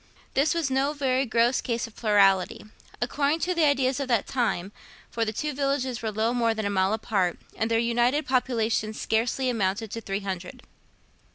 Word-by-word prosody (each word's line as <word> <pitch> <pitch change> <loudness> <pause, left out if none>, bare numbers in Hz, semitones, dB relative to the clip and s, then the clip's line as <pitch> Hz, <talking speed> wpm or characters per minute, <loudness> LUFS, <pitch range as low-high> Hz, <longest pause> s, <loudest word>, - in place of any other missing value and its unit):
This 295 +5 +2
was 320 -5 0
no 270 +3 +1
very 265 -2 0
gross 235 +3 +2
case 235 -1 -2
of 230 - -13
plurality, 200 -4 +3 0.3
according 285 +5 +1
to 365 - +1
the 335 -3 +3
ideas 270 -2 +2
of 275 - -2
that 235 -5 +1
time, 215 -7 -1 0.4
for 230 - -1
the 215 - -1
two 300 +7 -3
villages 270 -3 -1
were 225 - -2
little 220 +3 0
more 230 -2 +1
than 220 -1 -3
a 200 - 0
mile 190 +1 +2
apart, 200 -5 0 0.2
and 220 - -1
their 230 - +2
united 240 +5 +1
populations 230 -4 0
scarcely 235 +4 0
amounted 215 -2 -1
to 230 - -5
three 195 -1 -3
hundred. 185 -2 -6
235 Hz, 185 wpm, -26 LUFS, 215-265 Hz, 0.4 s, plurality